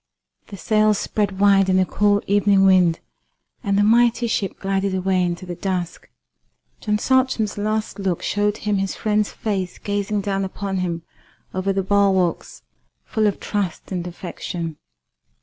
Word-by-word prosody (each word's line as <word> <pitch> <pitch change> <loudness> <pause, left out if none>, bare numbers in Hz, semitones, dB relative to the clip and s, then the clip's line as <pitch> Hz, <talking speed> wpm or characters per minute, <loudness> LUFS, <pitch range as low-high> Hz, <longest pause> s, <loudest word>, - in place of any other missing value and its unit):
The 200 - -9
sails 215 0 +2
spread 200 -2 -1
wide 195 -1 +4
in 185 - +3
the 185 - +3
cool 205 +2 +2
evening 200 -1 +3
wind, 180 -3 +4 0.6
and 200 -3 +1
the 205 - +4
mighty 235 +2 +4
ship 210 -4 -2
glided 195 0 -1
away 185 0 +1
into 175 +1 -2
the 180 - -5
dusk. 180 -1 -4 0.7
John 210 -1 0
Saltram's 255 -3 +1
last 215 +1 -2
look 190 -3 -1
showed 205 0 0
him 210 -1 -1
his 195 0 -2
friend's 210 -1 0
face 195 -4 -3
gazing 205 0 -2
down 195 -1 -1
upon 195 0 -4
him 170 -2 -2 0.5
over 185 +1 -1
the 195 0 0
bulwarks 190 -3 +1 0.4
full 220 -2 +1
of 205 - -1
trust 200 -5 -3
and 180 -2 -3
affection. 170 -2 -6
195 Hz, 150 wpm, -21 LUFS, 185-210 Hz, 0.7 s, wide